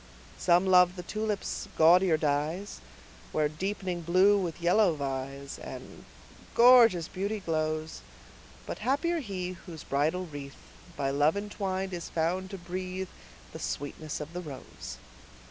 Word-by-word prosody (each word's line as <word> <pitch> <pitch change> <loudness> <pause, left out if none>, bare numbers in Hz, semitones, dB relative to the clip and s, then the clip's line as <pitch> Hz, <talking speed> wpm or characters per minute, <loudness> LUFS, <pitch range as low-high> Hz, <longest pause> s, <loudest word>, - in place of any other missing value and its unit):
Some 175 +1 +4
love 180 -1 +5
the 180 - -6
tulip's 215 +1 -3
gaudier 170 +1 +6
dyes, 155 +6 -1 0.5
Where 155 -1 +2
deepening 180 +2 -3
blue 185 +5 +5
with 175 -4 -3
yellow 175 +1 +4
vies, 135 0 -4
And - - -9 0.5
gorgeous 235 -8 +7
beauty 200 +3 -3
glows; 155 -3 -2 0.6
But - - -5
happier 335 +6 +1
he, 190 - -4 0.2
whose 165 -4 -8
bridal 155 +6 0
wreath, 145 -4 -8 0.4
By 135 -1 0
love 145 +6 +3
entwined, 195 -2 -3
is 175 -1 -5
found 180 +3 -1
to 195 - -6
breathe 185 +1 -5 0.4
The - - -7
sweetness 145 - -4
of 150 +2 -7
the 180 - -4
rose. 130 - -9
175 Hz, 130 wpm, -29 LUFS, 155-190 Hz, 0.6 s, gorgeous